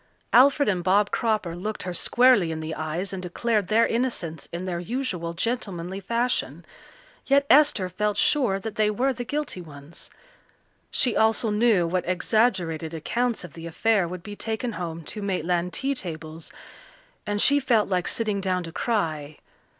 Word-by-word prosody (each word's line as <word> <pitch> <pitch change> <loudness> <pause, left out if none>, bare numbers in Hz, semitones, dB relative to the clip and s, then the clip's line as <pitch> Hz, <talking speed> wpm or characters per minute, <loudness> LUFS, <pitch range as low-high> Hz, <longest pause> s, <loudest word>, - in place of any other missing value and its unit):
Alfred 280 +3 +6
and 185 -4 0
Bob 200 +3 +3
Cropper 215 -7 0
looked 210 +5 -4
her 180 - -4
squarely 240 -2 +4
in 160 - -4
the 160 0 -4
eyes 165 +5 -3
and 190 - -4
declared 205 +3 -1
their 225 +2 +4
innocence 225 - -2
in 175 +2 -5
their 175 -2 -3
usual 180 -5 -3
gentlemanly 190 -4 -3
fashion, 235 +5 -1 0.6
yet 280 0 +4
Esther 280 -10 +5
felt 210 +3 -1
sure 250 -10 +2
that 220 +1 -7
they 215 -1 +3
were 255 +6 +1
the 245 0 -5
guilty 290 -7 -3
ones. 150 -1 -11 0.8
She 245 - +1
also 220 0 +2
knew 210 -4 +3
what 180 +1 -1
exaggerated 180 -5 0
accounts 235 +7 -1
of 180 - -10
the 165 0 -8
affair 200 +2 +1
would 180 0 -7
be 205 -1 -8
taken 225 +3 -3
home 170 -5 -5
to 210 +7 -6
Maitland 180 -2 -1
tea 275 +7 -1
tables, 160 - -6 0.8
and 205 0 -1
she 285 +6 +5
felt 240 -6 +2
like 180 -2 0
sitting 210 -3 -1
down 185 -1 -1
to 165 - -8
cry. 160 - -2
195 Hz, 165 wpm, -25 LUFS, 170-230 Hz, 0.8 s, Alfred